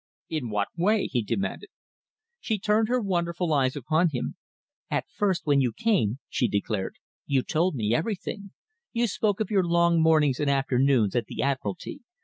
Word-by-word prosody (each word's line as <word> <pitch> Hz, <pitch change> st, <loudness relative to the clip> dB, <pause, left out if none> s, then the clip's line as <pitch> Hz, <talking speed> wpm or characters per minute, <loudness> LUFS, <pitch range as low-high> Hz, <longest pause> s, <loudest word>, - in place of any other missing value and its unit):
"In 150 Hz, -7 st, -3 dB
what 105 Hz, -1 st, -1 dB
way?" 200 Hz, +5 st, +2 dB
he 125 Hz, -2 st, 0 dB
demanded. 155 Hz, -, -3 dB, 0.7 s
She 220 Hz, -, -1 dB
turned 210 Hz, +2 st, +2 dB
her 250 Hz, +2 st, +1 dB
wonderful 175 Hz, -4 st, -1 dB
eyes 130 Hz, -3 st, +2 dB
upon 155 Hz, +5 st, +1 dB
him. 125 Hz, -5 st, -4 dB, 0.5 s
"At -, -, -1 dB
first 195 Hz, -4 st, -1 dB
when 145 Hz, -2 st, +4 dB
you 125 Hz, -3 st, +1 dB
came," 135 Hz, -, +1 dB
she 125 Hz, -, 0 dB
declared, 100 Hz, -1 st, -2 dB, 0.3 s
"you 135 Hz, -2 st, +2 dB
told 165 Hz, +1 st, 0 dB
me 110 Hz, -2 st, 0 dB
everything. 200 Hz, -, -3 dB, 0.4 s
You 235 Hz, 0 st, +2 dB
spoke 205 Hz, -2 st, 0 dB
of 220 Hz, 0 st, -2 dB
your 195 Hz, -3 st, +3 dB
long 170 Hz, -1 st, +3 dB
mornings 155 Hz, -5 st, +3 dB
and 145 Hz, -1 st, +1 dB
afternoons 135 Hz, -5 st, +2 dB
at 120 Hz, -, 0 dB
the -, -, -3 dB
Admiralty. 130 Hz, -8 st, -3 dB
155 Hz, 165 wpm, -26 LUFS, 130-195 Hz, 0.7 s, when